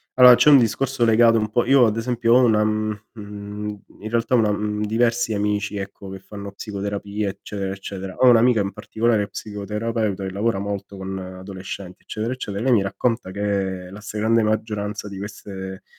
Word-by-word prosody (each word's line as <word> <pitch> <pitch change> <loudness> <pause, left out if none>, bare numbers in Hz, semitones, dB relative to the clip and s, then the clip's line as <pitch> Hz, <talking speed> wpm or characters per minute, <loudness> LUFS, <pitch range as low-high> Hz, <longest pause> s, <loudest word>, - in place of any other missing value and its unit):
allora 125 -1 +9
c'è 150 - +5
un 140 - +9
discorso 125 +1 +1
legato 115 0 +5
un 105 0 -1
po' 120 +2 +1
io 130 -1 +6
ad 110 0 +1
esempio 115 0 +1
ho 125 +1 +6
una 110 -3 +4
mhmm, 110 0 -1
mhmm, 105 -1 -7 0.2
in 110 - -5
realtà 115 +2 +1
una 110 -3 +3
mhmm, 105 0 -2
diversi 115 +1 +1
amici, 105 0 -1
ecco, 100 0 -7
che 95 0 -7
fanno 100 0 -9
psicoterapia 100 0 -4
eccetera, 100 0 -5
eccetera. 95 -1 -7
Ho 130 - +6
1 120 - +7
amica 115 -1 +4
in 100 0 -1
particolare 110 -1 0
psicoterapeuta 105 -1 -3
che 95 - -4
lavora 105 0 0
molto 100 0 -5
con 95 0 -5
adolescenti 95 0 -8
eccetera, 115 +3 -3
eccetera. 105 -6 -5
E - - -2
lei 130 0 +3
mi 105 - +4
racconta 105 +1 -1
che 95 -2 -2
la 105 +1 -10
stragrande 110 +2 +1
maggioranza 105 -1 -2
di 100 -1 -8
queste 95 -2 -7
105 Hz, 185 wpm, -22 LUFS, 100-115 Hz, 0.2 s, allora